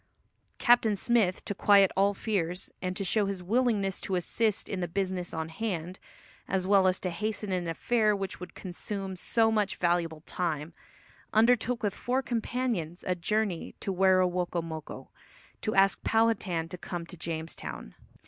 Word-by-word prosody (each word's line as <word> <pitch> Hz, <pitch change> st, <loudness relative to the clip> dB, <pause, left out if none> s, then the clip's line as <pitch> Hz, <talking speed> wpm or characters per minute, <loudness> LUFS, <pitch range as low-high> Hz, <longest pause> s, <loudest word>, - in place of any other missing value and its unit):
Captain 235 Hz, -3 st, +4 dB
Smith, 200 Hz, -3 st, +1 dB
to -, -, -1 dB
quiet 200 Hz, -1 st, +5 dB
all 200 Hz, +1 st, +3 dB
fears, 180 Hz, -5 st, -2 dB
and 185 Hz, 0 st, -2 dB
to 200 Hz, -, -1 dB
show 205 Hz, +1 st, +2 dB
his 195 Hz, -2 st, -4 dB
willingness 210 Hz, -2 st, +1 dB
to 190 Hz, -, -2 dB
assist 210 Hz, +4 st, +1 dB
in 195 Hz, -, -3 dB
the 175 Hz, -, -1 dB
business 185 Hz, 0 st, -2 dB
on 160 Hz, 0 st, -3 dB
hand, 180 Hz, -1 st, -4 dB, 0.5 s
as 190 Hz, -1 st, 0 dB
well 195 Hz, -1 st, +5 dB
as 185 Hz, 0 st, +2 dB
to 180 Hz, -, -2 dB
hasten 210 Hz, +2 st, -3 dB
an 180 Hz, -2 st, -1 dB
affair 215 Hz, +5 st, +2 dB
which 195 Hz, -1 st, -4 dB
would 180 Hz, 0 st, -9 dB
consume 195 Hz, +1 st, -5 dB
so 225 Hz, +5 st, +2 dB
much 210 Hz, -2 st, +1 dB
valuable 170 Hz, -3 st, 0 dB
time, 160 Hz, -2 st, -3 dB, 0.6 s
undertook 235 Hz, +1 st, +3 dB
with 205 Hz, -2 st, +1 dB
four 255 Hz, +5 st, -1 dB
companions 230 Hz, -8 st, -2 dB
a 185 Hz, -, +2 dB
journey 195 Hz, 0 st, -1 dB
to 195 Hz, -, -2 dB
Werowocomoco, 180 Hz, -4 st, 0 dB, 0.5 s
to 215 Hz, -, -1 dB
ask 195 Hz, 0 st, +4 dB
Powhatan 210 Hz, -7 st, +1 dB
to 180 Hz, -, -7 dB
come 175 Hz, -1 st, -5 dB
to 180 Hz, -, -10 dB
Jamestown. 160 Hz, -, -5 dB
190 Hz, 155 wpm, -29 LUFS, 175-215 Hz, 0.6 s, quiet